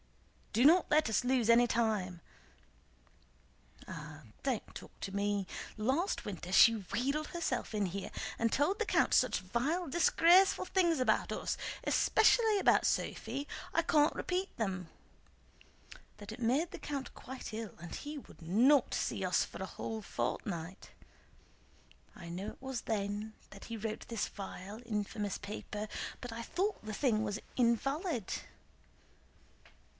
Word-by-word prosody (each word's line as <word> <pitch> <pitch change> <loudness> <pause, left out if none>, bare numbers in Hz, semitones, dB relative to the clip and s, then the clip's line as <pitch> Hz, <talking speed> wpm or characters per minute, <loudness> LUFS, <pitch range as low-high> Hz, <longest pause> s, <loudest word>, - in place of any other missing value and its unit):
"Do 235 +5 +3
not 340 +4 +6
let 300 -4 +4
us 220 +2 +2
lose 245 -2 +2
any 235 +1 +7
time..." 215 -7 0 1.7
"Ah, 150 0 -8 0.2
don't 260 -5 -2
talk - - -9
to 195 - -5
me! 200 -1 0 0.3
Last 265 - 0
winter 180 -3 -6
she 230 +4 +8
wheedled 250 +9 -2
herself 320 -9 -2
in 210 -2 +1
here 190 +2 -4 0.3
and 230 -1 +2
told 335 +9 +2
the 445 - +1
count - - +2
such - - +4
vile, 270 - -1
disgraceful 345 +5 +5
things 345 -5 +2
about 255 - +2
us, - - -2 0.3
especially 440 0 +4
about 390 - +4
Sophie—I 290 +3 -1
can't 300 -1 +4
repeat 370 +2 -2
them—that 205 - -9
it 220 - -9
made 270 +9 +1
the - - -7
count 280 -3 -5
quite 260 -3 -8
ill 220 -4 -5
and 170 0 -7
he 295 +1 -6
would 270 - -12
not 240 - +4
see - - -1
us - - +2
for - - -9
a - - -3
whole 220 -1 -5
fortnight. 180 -3 -4 1.3
I 175 - -10
know 180 +4 -5
it - - -9
was 265 -2 -4
then 210 0 -2 0.3
he 230 - -5
wrote 220 0 -4
this 230 -2 -2
vile, 200 +2 -8
infamous 210 -2 -2
paper, 210 +1 -6 0.3
but 245 -2 -6
I 230 - -5
thought 375 - -2
the 215 - -5
thing 220 -2 +1
was 205 -1 -2 0.2
invalid." 255 - 0
230 Hz, 140 wpm, -33 LUFS, 205-295 Hz, 1.7 s, she